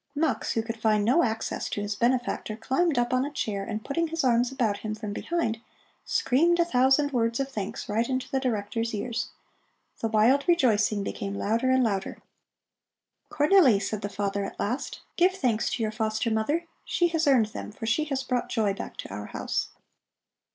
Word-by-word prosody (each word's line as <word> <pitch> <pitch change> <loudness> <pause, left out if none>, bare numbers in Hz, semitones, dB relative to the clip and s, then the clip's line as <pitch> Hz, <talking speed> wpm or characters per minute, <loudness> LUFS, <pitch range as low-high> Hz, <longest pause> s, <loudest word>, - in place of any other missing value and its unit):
Mux, 300 -1 0
who 225 - 0
could 225 0 -6
find 215 -2 +3
no 265 +10 +4
access 225 -3 -2
to - - -3
his 205 0 -2
benefactor, 240 -1 0
climbed 265 +7 0
up 240 +1 +1
on 255 0 +3
a 285 - -2
chair, 205 -8 -2
and 215 +1 -5
putting 335 +4 0
his 330 -1 -2
arms 245 0 +3
about 230 -7 0
him 215 -1 -4
from 210 -2 -5
behind, 230 -6 -2 0.4
screamed 340 +7 +2
a 340 - +4
thousand 270 0 +3
words 230 -2 0
of 275 0 -1
thanks 205 -5 -5
right 225 +4 0
into 260 0 -1
the 270 - +1
Director's 230 -2 -2
ears. 230 +3 -3 0.7
The 225 - 0
wild 230 +7 +3
rejoicing 215 - +3
became 200 0 -4
louder 230 +6 0
and 260 0 +4
louder. 195 -4 -1 1.1
"Cornelli," 295 - +5
said 210 +1 -3
the 205 - -3
father 200 0 -2
at 195 - -7
last, 245 +6 -3 0.2
"give 360 +2 +4
thanks 245 - 0
to 230 - -1
your 215 - 0
foster 220 +1 -1
mother! 290 +11 0 0.2
She 350 -1 +1
has 325 -2 0
earned 245 -6 +4
them, - - -6
for 225 - -7
she 230 +8 +1
has 275 -3 -2
brought 250 -2 -1
joy 210 -3 +1
back - - -7
to - - -7
our 105 +1 -6
house." - - -2
235 Hz, 190 wpm, -27 LUFS, 215-270 Hz, 1.1 s, Cornelli